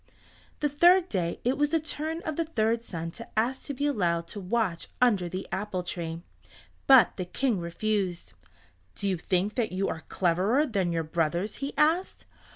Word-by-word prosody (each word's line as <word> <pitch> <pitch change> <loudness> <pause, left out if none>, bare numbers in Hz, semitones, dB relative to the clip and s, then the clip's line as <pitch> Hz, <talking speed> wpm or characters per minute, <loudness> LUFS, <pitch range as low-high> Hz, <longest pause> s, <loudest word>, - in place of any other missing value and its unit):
The 295 - +3
third 345 +5 +5
day 170 -4 -1
it 255 +4 0
was 295 0 +3
the 325 +1 +2
turn 315 +2 -4
of 315 - -3
the 330 - 0
third 230 -6 0
son 165 -6 -5
to 230 +6 -9
ask 245 +4 +1
to 285 - -4
be 285 - -1
allowed 170 -11 0
to 205 - -6
watch 195 -3 -1
under 205 -8 +3
the 185 +2 -5
apple 190 -2 -2
tree. 170 -1 -4 0.6
But 265 -3 +7
the 185 - -3
King 230 +3 0
refused. 175 - -2 0.6
"Do 200 - -2
you 190 -2 +1
think 185 +5 0
that 235 -7 -1
you 190 +2 -1
are 160 - -4
cleverer 190 - +2
than 195 - 0
your 165 -1 0
brothers?" 170 +5 -1
he 275 +1 -4
asked. 320 +5 +1
210 Hz, 180 wpm, -28 LUFS, 175-275 Hz, 0.6 s, But